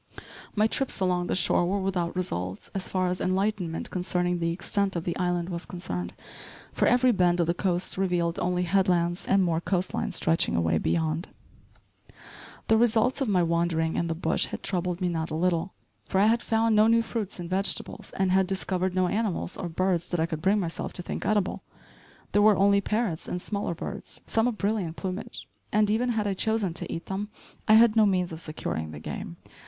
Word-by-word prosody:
My 210 0 +3
trips 260 +2 0
along 180 -2 +1
the - - 0
shore 180 -1 +3
were 200 +2 0
without 185 -3 -1
results, 95 - -4
so 195 - -1
far 185 -1 0
as 180 - -2
enlightenment 185 -3 -1
concerning 180 -1 0
the 170 0 0
extent 195 +2 -1
of 170 - -2
the 170 - -2
island 175 -1 -1
was 170 -1 -5
concerned, 90 - -5 0.6
for - - +2
every 250 +1 +4
bend 180 -4 +2
of 170 - +3
the 170 - +1
coast 180 0 -2
revealed 175 -3 0
only 180 0 0
headlands 175 -1 +1
and 195 -1 +4
more 165 -2 0
coast 185 0 -1
line - - -2
stretching 165 0 +1
away 80 -1 +2
beyond. 160 - 0 1.4
The 220 - +5
results 240 +4 +2
of 270 - +1
my 185 -4 +3
wandering 170 -1 0
in 170 - 0
the 165 - -2
bush 160 0 +1
had - - -7
troubled 180 -1 -2
me 180 - +1
not 165 -2 -2
a 155 - -3
little, 175 +1 0 0.3
for 190 - 0
I 200 - +5
had 230 +2 +3
found 225 0 +2
no 215 +1 +6
new 230 0 +4
fruits 220 -5 -4
and 175 - -5
vegetables, 190 +2 -1
and 190 -1 +2
had 190 0 +3
discovered 185 -1 -1
no 185 -1 +2
animals, 200 -3 -1
or 175 - -4
birds 180 0 0
that 175 - -1
I 160 - +3
could 160 -2 -5
bring 195 +4 +3
myself 170 -4 -4
to 180 - -4
think - - -4
edible. 210 -3 0 0.7
There 205 - +3
were 210 -2 +6
only 200 +1 +4
parrots 210 -6 -1
and 180 - -3
smaller 200 -2 -3
birds, 200 +4 -7
some 225 +1 +1
of 240 -3 -2
brilliant 200 -6 -1
plumage; 190 +2 -5 0.2
and 210 0 +3
even 240 +3 +1
had 220 -3 0
I 200 - 0
chosen 215 -2 0
to 170 - -5
eat 165 - -5
them 200 +2 -4 0.4
I 215 - +7
had 225 0 +6
no 215 -2 +5
means 180 -3 +1
of 160 0 -6
securing 80 - -4
the 75 -1 -8
game. 85 +2 -6
185 Hz, 205 wpm, -27 LUFS, 170-205 Hz, 1.4 s, I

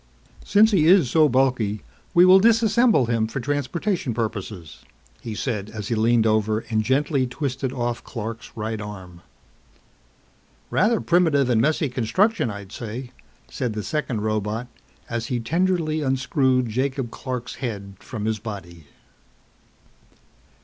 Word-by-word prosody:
"Since 220 +2 +4
he 165 -6 +3
is 175 -8 +5
so 155 -2 +5
bulky, 125 -5 +1 0.3
we 175 +1 +8
will 185 +1 +8
disassemble 225 - +4
him 115 -2 +1
for 115 +5 -4
transportation 145 - -2
purposes," 105 -7 -5 0.4
he 110 -2 -6
said 105 -4 -3
as 105 -2 -6
he - - 0
leaned 115 +1 +3
over 110 0 +1
and 110 -1 +2
gently 135 +3 +1
twisted 130 0 -3
off 120 -2 -3
Clark's 115 -1 -6
right 110 -1 -4
arm. 95 -5 -9 1.5
"Rather 215 +4 +3
primitive 160 -7 +3
and 115 -2 +3
messy 155 +3 +1
construction, 135 - +1
I'd 100 -2 -8
say," 120 +3 -6 0.4
said 125 -5 -3
the 105 -1 -4
second 130 -6 -2
robot 110 +2 -2 0.4
as 115 -1 -3
he 125 - -1
tenderly 165 +3 0
unscrewed 130 -1 +1
Jacob 130 +1 -2
Clark's 125 -2 -5
head 100 -6 -5
from 110 -4 -6
his 110 -1 -1
body. 85 -7 -8
120 Hz, 135 wpm, -23 LUFS, 110-145 Hz, 1.5 s, we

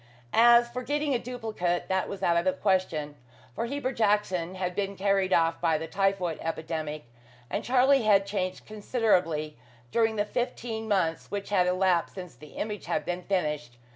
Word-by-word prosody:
As 235 +1 +6
for 245 +1 -5
getting 290 +2 -1
a 245 - +1
duplicate, 220 -8 -3
that 190 0 0
was 195 -1 -6
out 170 - +3
of 170 - +2
the 280 - +3
question, 185 - 0 0.4
for 230 - -3
Heber 275 0 -2
Jackson 205 -6 0
had 180 -1 -2
been 200 +1 -2
carried 195 -1 +1
off 165 -2 +2
by 165 -2 +2
the 160 - -5
typhoid 190 -2 0
epidemic, 160 -2 -4 0.5
and - - -2
Charlie 265 +2 +4
had 205 -3 +4
changed 190 -2 -3
considerably 185 - 0 0.3
during 225 -1 +2
the 205 -1 0
fifteen 230 -1 -3
months 185 -6 0
which 200 0 -5
had 180 -3 +3
elapsed 180 -1 +1
since 180 -3 -8
the 150 -1 -14
image 210 -2 -4
had - - -1
been 180 0 -3
finished. 150 -10 -2
195 Hz, 170 wpm, -28 LUFS, 170-225 Hz, 0.5 s, As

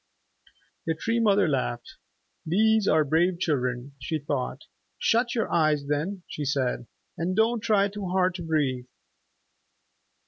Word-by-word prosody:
The 160 - +1
Tree 230 +8 -1
Mother 205 -4 +4
laughed. 125 -4 -2 0.5
"These 215 +5 +3
are 155 0 +4
brave 170 +5 +2
children," 130 -5 -1
she 150 +5 -2
thought. 140 -1 -3 0.3
"Shut 240 +2 +1
your 225 - -1
eyes 155 -3 +2
then," 160 +7 -2
she 150 - -5
said, 130 -4 -1 0.3
"and 180 +3 -1
don't 225 +2 +2
try 210 -2 +2
too 200 -1 -6
hard 185 0 +2
to 180 - -7
breathe." 140 -6 -1
165 Hz, 135 wpm, -26 LUFS, 140-200 Hz, 0.5 s, Mother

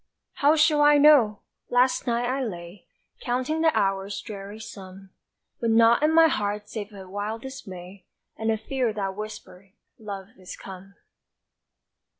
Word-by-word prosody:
How 290 +2 +5
shall 305 -1 +4
I 295 0 +6
know? 280 -8 +5 0.3
last 250 +1 +2
night 240 0 0
I 265 +2 -1
lay 175 -3 -8 0.3
Counting 255 +6 -2
the 325 - +5
hours' 195 0 -1
dreary 205 0 -8
sum 195 -3 -11 0.5
With 230 - -1
naught 230 +2 +5
in 305 +1 +3
my 325 0 +6
heart 210 -6 -2
save 210 -1 -6
a 195 -2 -11
wild 205 +4 -5
dismay 190 -8 -10 0.3
And 220 0 -2
a 220 - +1
fear 240 +1 -2
that 195 -2 -3
whispered, 195 -2 -9 0.3
"Love 200 -3 -7
is 185 0 -9
come!" 195 +1 -11
215 Hz, 150 wpm, -25 LUFS, 195-255 Hz, 0.5 s, I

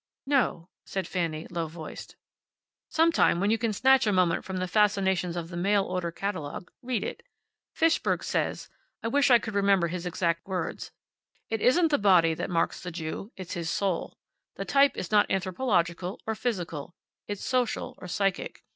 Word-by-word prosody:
"No," 260 - +1 0.2
said 190 -3 -4
Fanny, 165 -4 -2
low 170 -2 -2
voiced. 160 -1 -9 0.7
"Sometime, 325 - +3
when 200 +3 +2
you 225 - +2
can 230 -2 0
snatch 260 +3 +4
a - - +3
moment 180 -3 +2
from 190 -1 -5
the 185 0 -1
fascinations 190 -3 +2
of 165 -1 -4
the 175 - -7
mail 200 +3 +2
order 180 -2 -2
catalogue, 175 -3 -5
read 245 -4 -1
it. - - -5 0.5
Fishberg 330 0 +2
says - - -1 0.4
I 225 - 0
wish 280 +3 +3
I 245 - +8
could 220 -1 -6
remember 195 -4 +3
his 180 +1 -4
exact 170 -1 -1
words 185 -2 -3 0.6
`It 225 - 0
isn't 325 +9 +4
the 290 - +3
body 180 -5 +5
that - - -4
marks 170 -2 0
the 180 - -5
Jew. 175 +5 -5
It's 185 -2 -6
his 170 -1 -3
Soul. 190 -3 -1 0.4
The - - -4
type 280 0 +4
is 185 0 -4
not 210 -1 +4
anthropological, 185 -2 0
or 220 - -1
physical; 175 - -4 0.3
it's 205 -1 -5
social 250 -2 0
or 180 - -8
psychic. 195 +1 -2
190 Hz, 175 wpm, -28 LUFS, 175-220 Hz, 0.7 s, I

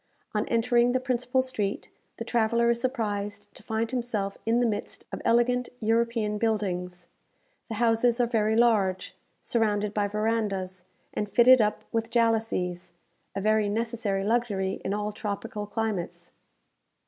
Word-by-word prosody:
On 210 0 0
entering 240 +1 +3
the 255 - +2
principal 255 0 0
street, 215 -6 -3 0.3
the 230 - -5
traveller 235 0 +2
is 235 0 -1
surprised 210 -5 -3
to - - -13
find 225 +1 -2
himself 230 -6 -2
in 230 +1 +3
the 245 - +3
midst 210 -3 -3
of - - -5
elegant 245 +1 +2
European 225 -1 0
buildings. 180 -5 -2 0.6
The 225 - -4
houses 235 +1 +2
are 245 - +4
very 220 -2 +1
large, 215 -6 +2 0.3
surrounded 210 -3 0
by 205 -1 +1
verandahs, 200 -4 -2 0.3
and 210 - -2
fitted 245 +3 +7
up 210 0 0
with 225 -1 -1
jalousies 225 -7 0 0.4
a 195 - -2
very 215 0 +2
necessary 220 -3 -1
luxury 205 -4 0
in 195 - -1
all 210 0 -2
tropical 210 0 -5
climates. 210 -4 -3
220 Hz, 140 wpm, -27 LUFS, 205-235 Hz, 0.6 s, fitted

